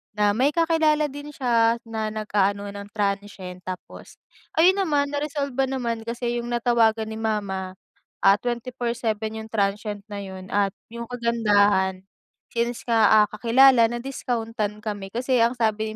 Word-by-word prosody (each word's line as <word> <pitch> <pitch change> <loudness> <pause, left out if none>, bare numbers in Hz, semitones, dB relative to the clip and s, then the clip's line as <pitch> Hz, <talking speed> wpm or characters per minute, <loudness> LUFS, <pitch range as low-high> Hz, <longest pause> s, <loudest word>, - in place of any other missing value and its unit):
na 205 0 +3
may 265 +5 +3
kakilala 320 -2 +3
din 290 +1 -8
siya 230 -3 +3
na 220 -1 -3
nag-aano 205 -1 0
ng 200 0 -9
transient 200 -3 -3
tapos 185 0 -9 0.4
ayun 365 +4 +6
naman 300 -8 +1
na-resolve 285 -2 -3
ba 270 - +2
naman 245 -4 -2
kasi 240 +1 -3
yung 235 - -7
natawagan 230 -2 +2
ni - - -5
mama, 195 -4 -2 0.5
ah, 195 +1 +6
24/7 235 -2 -3
yung 220 0 -9
transient 205 0 -1
na 205 - -4
yun 190 -1 -9
at 200 -1 +2 0.2
yung 235 0 -6
kagandahan, 205 -5 +2 0.5
since 235 0 -1
nga, 220 -2 +5
ah, - - 0
kakilala, 235 +2 +5
na-discount-an 230 -4 -3
kami 205 -3 -5
kasi 250 +1 +1
ang 235 +2 +3
sabi 220 -2 -1
225 Hz, 145 wpm, -24 LUFS, 205-245 Hz, 0.5 s, ayun